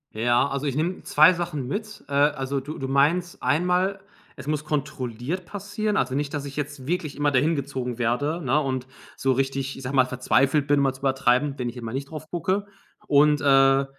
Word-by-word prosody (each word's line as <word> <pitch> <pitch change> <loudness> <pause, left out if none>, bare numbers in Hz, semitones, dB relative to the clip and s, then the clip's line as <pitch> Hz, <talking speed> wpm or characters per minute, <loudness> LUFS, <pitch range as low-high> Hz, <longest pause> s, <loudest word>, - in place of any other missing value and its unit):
Ja, 120 +4 +2
also, 140 +1 -3
ich 140 -3 -1
nehme 170 +5 -2
2 155 +4 +6
Sachen 170 -7 -4
mit. 215 - -5
Äh, - - -12
also, 140 -1 +1
du 145 +4 -7
du 135 - -4
meinst 160 +6 +1
einmal, 180 +7 +1 0.3
es - - -10
muss 150 0 -1
kontrolliert 140 +2 -3
passieren, 205 +2 -3
also 130 -5 0
nicht, 145 +1 -2
dass 145 -2 -2
ich 140 -1 -8
jetzt 145 -2 -5
wirklich 165 -1 -2
immer 145 0 +1
dahin 145 +5 +2
gezogen 130 -4 -4
werde, 145 +8 0
ne, 135 +3 +2
und 130 -3 -2 0.3
so 135 - +1
richtig, 135 +1 -1
ich 135 - -9
sage 130 +2 -3
mal, 130 -1 +5
verzweifelt 135 +3 +1
bin, 145 -1 +3
um - - +3
mal 135 -1 +2
zu 135 - -14
übertreiben, 135 +1 +2
wenn 125 -1 -2
ich 120 - -10
einmal 115 -2 -6
nicht 135 +1 -4
drauf 155 0 -8
gucke. 185 +4 -1 0.4
Und, 150 +1 +5
äh, 135 -1 +5
140 Hz, 205 wpm, -25 LUFS, 130-155 Hz, 0.4 s, 2